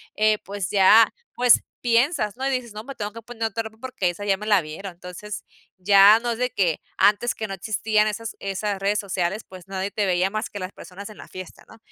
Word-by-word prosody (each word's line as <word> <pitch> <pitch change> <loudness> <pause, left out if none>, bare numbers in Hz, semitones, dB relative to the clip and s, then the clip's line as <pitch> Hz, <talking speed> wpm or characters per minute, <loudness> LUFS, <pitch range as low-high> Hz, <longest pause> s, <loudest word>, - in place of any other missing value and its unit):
Eh, 215 0 +3
pues 200 -2 -4
ya, 210 +3 +6 0.2
pues 245 -1 +5 0.2
piensas, 240 - +2
¿no? 260 +2 -4
Y - - +1
dices: 250 -4 -3
"No, 215 +1 -7
me 275 +3 -8
tengo 205 0 -5
que 230 - -9
poner 230 0 -7
otra 225 +1 -1
ropa 220 0 -10
porque 250 -7 -2
esa 190 +4 -6
ya 195 -1 +3
me 210 - -7
la 205 -4 +4
vieron". 175 +5 -8
Entonces, 180 +4 -8 0.3
ya 200 +3 +7
no 240 0 -2
es 225 - -3
de 250 0 +1
que 175 -8 0 0.2
antes 210 +4 +3
que 220 - -4
no 195 - -5
existían 215 +2 +1
esas 215 +1 -4
esas 200 +1 -3
redes 205 +2 +1
sociales, 190 +1 -2
pues 185 0 -12
nadie 195 +1 -3
te 205 -1 0
veía 180 +1 +2
más 215 +2 -3
que 205 - -7
las 185 0 -5
personas 200 +3 -10
en 215 - -13
la - - -11
fiesta, 185 -1 -10
¿no? - - -14
210 Hz, 235 wpm, -23 LUFS, 195-225 Hz, 0.3 s, ya